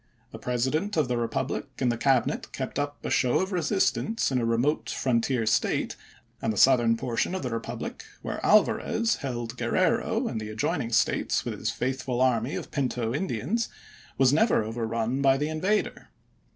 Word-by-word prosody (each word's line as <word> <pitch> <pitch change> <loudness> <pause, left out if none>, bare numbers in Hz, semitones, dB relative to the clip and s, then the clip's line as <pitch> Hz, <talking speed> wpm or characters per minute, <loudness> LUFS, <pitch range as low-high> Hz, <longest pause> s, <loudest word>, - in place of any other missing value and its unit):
The - - -9
President 130 - -1
of 150 -4 +3
the 120 - 0
republic 115 -1 -2
and 125 - +1
the - - -1
Cabinet 130 +1 +1
kept - - -4
up 145 0 -4
a - - -2
show 125 -2 +3
of 190 +1 -1
resistance 190 +3 0
in 130 - +1
a 115 - 0
remote 120 +6 +1
frontier 120 -1 0
State; 110 - +1 0.5
and 115 - 0
the 105 - -5
southern 120 -3 +5
portion 120 +9 -1
of 190 - -4
the 125 - -3
republic, 115 - -5 0.2
where - - -4
Alva - - +5
rez 230 0 0
held 120 -4 -5
Gruerrero - - +1
and 110 - -3
the 110 - -6
adjoining 115 +3 -2
States 110 - +1
with - - -2
his - - -3
faithful 130 -1 -2
army 125 0 +2
of - - -6
Pinto 125 -4 -1
Indians, 165 - -1 0.5
was 135 0 +4
never 215 - +3
overrun 115 +3 -2
by 135 -1 +4
the 150 +2 -1
invader. 185 +7 -1
130 Hz, 175 wpm, -27 LUFS, 115-150 Hz, 0.5 s, southern